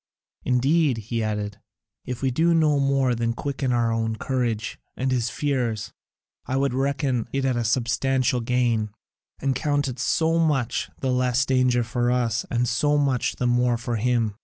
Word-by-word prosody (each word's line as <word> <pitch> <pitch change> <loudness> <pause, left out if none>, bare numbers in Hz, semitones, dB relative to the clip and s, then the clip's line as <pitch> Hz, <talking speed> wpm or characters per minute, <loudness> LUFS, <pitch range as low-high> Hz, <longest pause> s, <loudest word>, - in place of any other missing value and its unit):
Indeed," 135 +2 +2
he 115 +1 -3
added, 105 -1 -3 0.4
"if 125 +1 -5
we 135 - +2
do 165 +6 +3
no 155 -3 +3
more 135 -2 +2
than 115 0 -1
quicken 135 +1 -2
our 120 -1 +2
own 115 0 -1
courage 115 -3 -2 0.2
and 130 +1 -1
his 120 -2 0
fears, 120 -8 -2 0.5
I 130 - -1
would 140 -1 +1
reckon 135 -2 0
it 135 0 -1
a 120 -3 +1
substantial 130 +2 +1
gain, 115 -2 +1 0.5
and 135 0 0
count 145 +1 0
it 125 -2 -5
so 160 +8 +1
much 135 -7 0
the 130 - 0
less 125 +1 +2
danger 130 -2 +2
for 120 +1 -1
us 120 -2 0
and 120 0 0
so 145 +6 +2
much 135 -4 +1
the 125 - -2
more 120 0 +2
for 115 0 -3
him. 115 -1 +1
125 Hz, 165 wpm, -24 LUFS, 115-135 Hz, 0.5 s, do